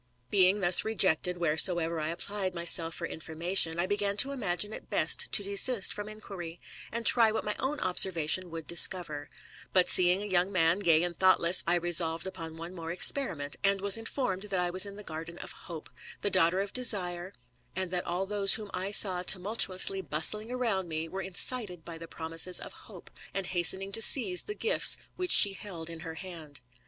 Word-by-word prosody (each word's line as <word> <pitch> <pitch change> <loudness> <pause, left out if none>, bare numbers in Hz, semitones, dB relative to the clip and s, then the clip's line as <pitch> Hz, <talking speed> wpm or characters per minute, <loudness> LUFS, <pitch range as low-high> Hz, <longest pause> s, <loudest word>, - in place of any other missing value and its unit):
Being 195 0 +2
thus 175 -1 +7
rejected 180 -4 +1
wheresoever 170 0 +1
I 155 - -3
applied 185 +3 -3
myself 170 -1 +5
for 170 - -6
information, 165 +2 +3
I 175 - 0
began 205 +1 -2
to 275 +6 +5
imagine 210 -5 -2
it - - -11
best - - 0
to 205 - +1
desist 200 +2 +1
from 205 0 -7
inquiry, 185 -6 -10 0.3
and 235 0 -5
try 230 -2 +5
what 220 - -4
my 210 - -3
own 285 +3 -3
observation 180 -1 +1
would 165 -1 -8
discover: 170 -4 0 0.4
but 185 -1 +3
seeing 185 +2 +3
a - - -6
young 185 -1 -1
man, 170 -1 +1
gay 165 -4 +2
and 175 -1 -4
thoughtless, 185 -1 +3
I 170 - +2
resolved 170 -1 -1
upon 165 -4 -9
one 170 +2 -9
more 165 -2 -8
experiment, 170 - +1
and 200 0 +1
was 200 0 +2
informed 225 -3 -4
that 195 -3 -3
I 175 0 -2
was 185 +3 +1
in 200 - -10
the 210 - -11
garden 165 0 -8
of - - -9
Hope, 165 -4 -11 0.3
the 205 - -2
daughter 185 +1 +2
of 200 0 -7
Desire, 190 -7 0 0.4
and 185 -1 -4
that 180 -1 -4
all 180 +2 -3
those 200 -1 +1
whom 210 -2 -8
I 190 +2 -4
saw 195 -2 +3
thus 180 - -8
tumultuously 190 -1 +1
bustling 175 - -3
round 225 -8 -2
me 160 0 -5
were 190 +2 -6
incited 190 -1 -2
by 165 -1 -9
the 165 - -10
promises 165 +2 -3
of - - -10 0.2
Hope, - - -14 0.2
and 195 -1 -3
hastening 190 +2 0
to 225 - -1
seize 205 -7 +4
the 415 - -8
gifts 460 +3 +2 0.2
which 365 0 -4
she 200 -2 +5
held 170 -5 -9
in 165 - -10
her 160 -1 -9
hand. 160 -5 -11
185 Hz, 195 wpm, -28 LUFS, 170-200 Hz, 0.4 s, thus